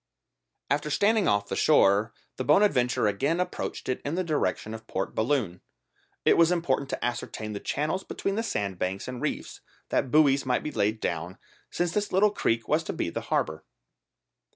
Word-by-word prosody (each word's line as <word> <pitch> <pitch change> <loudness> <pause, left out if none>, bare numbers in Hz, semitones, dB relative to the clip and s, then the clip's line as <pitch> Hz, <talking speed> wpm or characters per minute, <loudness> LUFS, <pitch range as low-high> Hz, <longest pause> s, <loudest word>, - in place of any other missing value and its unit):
After 145 +1 +1
standing 205 +6 +2
off 100 0 +2
the - - -3
shore 100 +3 +4 0.3
the 130 - -2
Bonadventure 130 - +3
again 135 - +1
approached 180 - -3
it 130 - -2
in 145 +3 -2
the 185 - 0
direction 130 - -1
of 110 0 -9
Port 95 - -3
Balloon. 110 -7 0 0.6
It - - +5
was 170 +1 +5
important 140 -6 0
to - - -3
ascertain 110 -3 -4
the 100 - -4
channels 155 - -2
between 195 - -3
the 220 - 0
sandbanks 95 - -2
and 125 -1 -6
reefs, - - -4 0.3
that - - 0
buoys 140 -1 +4
might 125 -1 0
be 150 - -3
laid 110 -1 0
down, 85 +3 -3 0.3
since 175 -1 -1
this 205 +2 -1
little 200 +3 +4
creek 115 - 0
was 155 +2 +2
to - - -3
be 85 - -2
the - - -3
harbour. 80 0 -1
130 Hz, 175 wpm, -27 LUFS, 105-165 Hz, 0.6 s, It